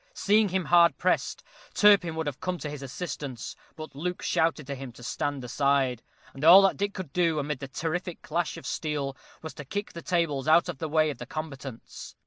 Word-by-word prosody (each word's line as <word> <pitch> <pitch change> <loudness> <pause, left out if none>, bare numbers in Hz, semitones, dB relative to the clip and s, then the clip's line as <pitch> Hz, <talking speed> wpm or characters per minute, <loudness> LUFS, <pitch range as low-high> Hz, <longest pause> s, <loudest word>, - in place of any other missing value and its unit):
Seeing 210 +1 +3
him 185 -1 -1
hard 170 -4 +5
pressed, 185 - 0 0.3
Turpin 195 -6 +5
would 160 0 -2
have 145 -2 -4
come 185 -1 -2
to 155 - -5
his 145 -2 -7
assistance; 140 -3 -6 0.2
but 155 0 -9
Luke 180 +6 -4
shouted 160 -2 +1
to 140 - -4
him 135 -2 -7
to 120 - -14
stand 140 +2 -3
aside, 135 -1 +1 0.3
and 135 - -9
all 180 +5 +9
that 195 - +3
Dick 200 0 -2
could 185 -7 -7
do, 170 -3 +2
amid 145 -1 -2
the 135 - -6
terrific 165 +5 -4
clash 170 +2 -2
of - - -10
steel, 145 -3 -3 0.3
was 160 - -6
to 150 - -8
kick 205 +9 -5
the 170 - -7
tables 165 -7 0
out 165 +2 +5
of - - -5
the 160 - -3
way 155 0 +3
of - - -10
the - - -7
combatants. 135 -6 -8
155 Hz, 210 wpm, -27 LUFS, 140-175 Hz, 0.3 s, all